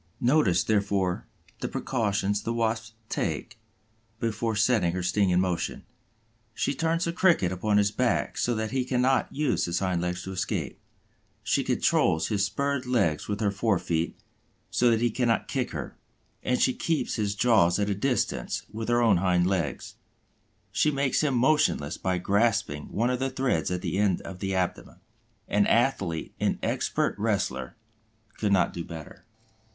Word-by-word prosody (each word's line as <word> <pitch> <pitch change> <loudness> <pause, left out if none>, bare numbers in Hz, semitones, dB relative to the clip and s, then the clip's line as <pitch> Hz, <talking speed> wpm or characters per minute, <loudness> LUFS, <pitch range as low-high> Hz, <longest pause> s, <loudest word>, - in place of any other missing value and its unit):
Notice, 120 - +3
therefore, 100 -4 0 0.3
the - - -2
precautions 105 -4 -1
the 115 - -2
Wasp 110 -1 -1
takes 115 +1 -3 0.6
before 115 0 -1
setting 105 -5 +2
her 90 0 -2
sting 95 +2 +2
in 90 0 +3
motion. 90 -2 -1 0.7
She - - 0
turns 165 +3 0
the 170 - -2
Cricket 170 - +3
upon 105 +3 +1
his 100 0 +3
back 125 +2 0
so 120 - 0
that 110 0 -2
he 130 -1 0
cannot 130 +1 +1
use 150 0 0
his 85 0 -1
hind 95 -3 0
legs 90 +1 -3
to 95 - -6
escape. 95 -1 -3 0.6
She - - +1
controls 80 0 +2
his 100 -3 +1
spurred 140 +5 -1
legs 100 -12 +1
with 105 +1 -3
her 100 -2 +2
fore 100 0 +1
feet, 85 -1 -2 0.5
so 120 - +3
that 115 -1 +2
he 120 -1 +2
cannot 120 -1 0
kick - - -1
her; - - -6 0.5
and 125 0 0
she 130 - +3
keeps 160 -2 -1
his 100 -2 -1
jaws 105 -6 +4
at 100 -1 0
a 105 - +1
distance 125 +6 -1
with 110 +1 -4
her 120 0 +3
own 105 -5 +5
hind 90 -1 +2
legs. 90 -7 -2 0.7
She 155 - +2
makes 140 -2 +1
him 145 -4 +1
motionless 120 - +2
by 95 -1 0
grasping 100 -6 +1
one 120 +4 +1
of 125 - -1
the 135 0 0
threads 130 0 0
at 90 -1 -3
the 90 +1 -1
end 100 -4 +2
of 95 -1 -9
the 95 0 -2
abdomen. 90 -1 -2 0.5
An 100 0 +2
athlete, 100 -10 +1
an - - +1
expert - - 0
wrestler, 65 -1 -1 0.6
could 105 -2 0
not 90 -3 +3
do 85 - -4
better. 80 -2 -10
105 Hz, 165 wpm, -27 LUFS, 90-125 Hz, 0.7 s, own